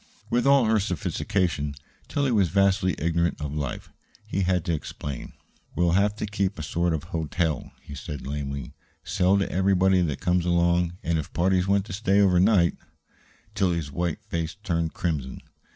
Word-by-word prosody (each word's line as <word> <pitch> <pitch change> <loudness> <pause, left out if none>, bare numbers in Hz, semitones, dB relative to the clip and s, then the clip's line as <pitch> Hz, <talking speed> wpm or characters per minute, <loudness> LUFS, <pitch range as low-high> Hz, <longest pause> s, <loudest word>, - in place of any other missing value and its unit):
With 120 +2 +2
all 140 -3 +6
her 110 0 +3
sophistication, 90 -5 -1 0.3
Tillie 140 -2 0
was 100 -6 +3
vastly 95 -1 +2
ignorant 85 +1 0
of 75 -2 -4
life. 75 -3 -4 0.3
He 100 - -2
had 90 -2 +1
to 85 - 0
explain. 70 -3 -6 0.4
"We'll 85 -1 +2
have 100 +3 +2
to 105 - -3
keep 100 -1 -1
a 80 - -5
sort 85 +2 0
of 75 - -4
hotel," 80 -1 -2
he - - -10
said 70 0 -6
lamely. 70 -2 -4 0.3
"Sell 95 +2 +2
to 100 - +1
everybody 95 0 +3
that 75 -6 -1
comes 90 0 +1
along, 85 0 +2
and 80 -1 +1
if 75 - -6
parties 90 +1 +2
want 100 0 +2
to 100 - -7
stay 100 -1 +2
over 95 -3 +4
night 95 -3 +4 0.4
" - - -32
Tillie's 85 -6 0
white 85 +1 -2
face 85 +1 -3
turned 85 -4 -1
crimson. 75 -7 -2
90 Hz, 170 wpm, -26 LUFS, 80-95 Hz, 0.4 s, all